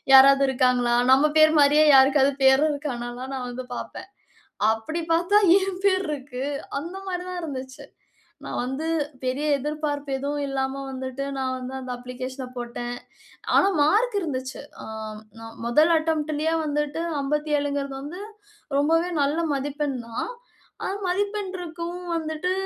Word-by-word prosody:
யாராவது 275 +1 +8
இருக்காங்களா? 250 -2 +2 0.2
நம்ம 270 +3 +5
பேர் 310 0 +6
மாரியே 295 +2 +6
யாருக்காவது 270 +1 +5
பேரு 265 +3 +6
இருக்கான்னல்லாம் 255 -2 -5
நா - - -3
வந்து 250 +1 -6
பார்ப்பேன். - - -7 0.6
அப்படி 225 +10 -4
பார்த்தா, 350 +5 +3 0.2
என் 380 -1 -3
பேர் 380 -1 +3
இருக்கு. 270 -3 -5 0.4
அந்த 340 +6 -7
மாரி 360 -1 -3
தான் 365 -1 -4
இருந்துச்சு. 260 -4 -6 0.6
நான் - - -3
வந்து 265 +5 -3 0.4
பெரிய 260 +4 -1
எதிர்பார்ப்பு 290 0 -3
எதுவும் 285 +1 -2
இல்லாம 270 0 -2
வந்துட்டு, 260 0 -5
நான் 260 -1 -1
வந்து 255 +1 -7
அந்த 255 -1 -6
அப்ளிகேஷன 255 +2 -6
போட்டேன். 240 0 -4 0.6
ஆனா 390 - +6
மார்க் 425 +10 +3
இருந்துச்சு. 260 -6 -4 0.2
அ - - -8 0.5
நா 225 - -9 0.2
மொதல் 300 +8 +4
அட்டெம்ப்ட்டுலயே 315 0 0
வந்துட்டு 295 +1 -1 0.2
57ங்குறது 285 -1 -1
வந்து 325 +7 -7 0.6
ரொம்பவே 330 +4 +2
நல்ல 285 +3 +1
மதிப்பெண் 285 0 -2
தான். 230 - -4 0.5
ஆனா, 385 - -2
மதிப்பெண் 405 +1 -1
இருக்கவும் 345 +1 -6
வந்துட்டு 315 +3 -2
285 Hz, 130 wpm, -24 LUFS, 260-320 Hz, 0.6 s, யாராவது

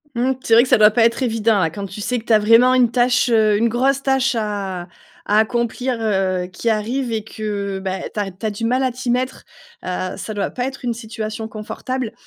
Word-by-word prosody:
Mmh, 245 +3 +1
c'est 225 - +1
vrai 235 - +7
que 255 - -4
ça - - +6
doit 210 0 +8
pas 225 +2 +3
être 235 +3 +1
évident, 225 -3 +1
là, 165 -3 +2
quand 200 +5 -6
tu 195 +2 -8
sais 250 +4 -1
que 225 - -7
tu 230 - +2
as 215 - +6
vraiment 230 +4 +5
une 250 -2 +4
tâche, 245 0 +2
heu, 215 -2 +4
une 230 +2 +2
grosse 265 +4 +1
tâche 265 -1 +1
à 200 -5 -3 0.4
à 210 - +2
accomplir, 235 +3 0
heu, 190 -4 0
qui 190 +5 -2
arrive 235 +4 -2
et 220 -2 -2
que 205 -2 -4
bah 190 0 -3
eh - - -5
tu - - -5
ar 205 - 0
tu - - -19
as - - 0
du 210 +2 -4
mal 250 +3 +1
à 260 -1 +1
t'y 250 0 -3
mettre, 255 +1 -2 0.4
heu, 185 0 -3
ça 215 - -6
doit 205 - -2
pas 250 - -3
être 270 +1 -6
une 240 -2 -1
situation 220 -1 -5
confortable. 225 +3 -5
225 Hz, 245 wpm, -20 LUFS, 210-245 Hz, 0.4 s, doit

